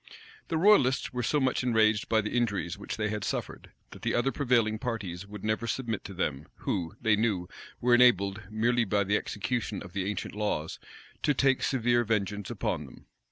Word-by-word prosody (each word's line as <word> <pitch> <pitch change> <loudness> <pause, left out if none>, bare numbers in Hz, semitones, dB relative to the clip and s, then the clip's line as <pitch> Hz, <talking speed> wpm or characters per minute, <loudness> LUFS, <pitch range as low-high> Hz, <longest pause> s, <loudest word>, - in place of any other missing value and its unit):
The 165 - -1
royalists 160 -11 +4
were 125 - -1
so 125 +6 +1
much 130 -2 +1
enraged 110 -3 +2
by 110 -1 +3
the 105 - -4
injuries 105 -7 0
which 100 - -6
they 105 -1 0
had 105 -1 -3
suffered, - - -4 0.2
that - - -12
the - - 0
other 125 +3 +2
prevailing 120 -5 +1
parties 100 -6 -4
would 105 -1 -9
never 110 +2 -1
submit 115 -5 -2
to 95 - -8
them, 75 -5 -2
who, 90 0 -3
they 110 -2 +3
knew, 105 -5 0 0.3
were 125 0 +3
enabled, 110 -5 +4
merely 120 +3 +2
by 100 -1 +1
the 100 +2 +1
execution 105 0 -2
of 95 -3 -12
the 100 0 -1
ancient 105 - -4
laws, 105 -7 -2 0.4
to 145 - +2
take 135 0 +3
severe 120 -2 +2
vengeance 105 -2 -1
upon 90 - -2
them. 60 - -16
110 Hz, 190 wpm, -29 LUFS, 100-120 Hz, 0.4 s, royalists